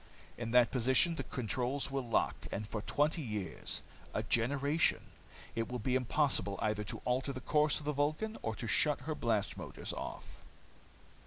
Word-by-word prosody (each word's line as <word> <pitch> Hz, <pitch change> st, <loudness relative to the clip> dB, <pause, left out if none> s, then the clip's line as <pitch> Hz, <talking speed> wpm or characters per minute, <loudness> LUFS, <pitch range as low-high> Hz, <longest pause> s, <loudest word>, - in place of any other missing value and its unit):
In 120 Hz, -1 st, -4 dB
that 125 Hz, 0 st, +5 dB
position 130 Hz, +7 st, +4 dB
the 165 Hz, -, -3 dB
controls 130 Hz, +3 st, -1 dB
will 135 Hz, 0 st, 0 dB
lock. 115 Hz, -3 st, 0 dB
And 105 Hz, +1 st, -3 dB
for 105 Hz, -1 st, -3 dB
twenty 150 Hz, +8 st, +1 dB
years, 105 Hz, -8 st, -3 dB, 0.3 s
a -, -, 0 dB
generation, 140 Hz, +6 st, +2 dB, 0.4 s
it 115 Hz, +1 st, -2 dB
will 125 Hz, -, -1 dB
be 125 Hz, +2 st, 0 dB
impossible 130 Hz, -5 st, +2 dB
either 105 Hz, -1 st, 0 dB
to -, -, -6 dB
alter 130 Hz, +3 st, +1 dB
the 130 Hz, -, -5 dB
course 150 Hz, +3 st, +3 dB
of 150 Hz, -, -7 dB
the 150 Hz, -, 0 dB
Vulcan 155 Hz, +10 st, 0 dB
or 110 Hz, -1 st, -2 dB
to 120 Hz, -, -5 dB
shut 145 Hz, +4 st, +2 dB
her 155 Hz, +4 st, -2 dB
blast 115 Hz, -7 st, 0 dB
motors -, -, -5 dB
off. -, -, -7 dB
130 Hz, 170 wpm, -34 LUFS, 115-145 Hz, 0.4 s, that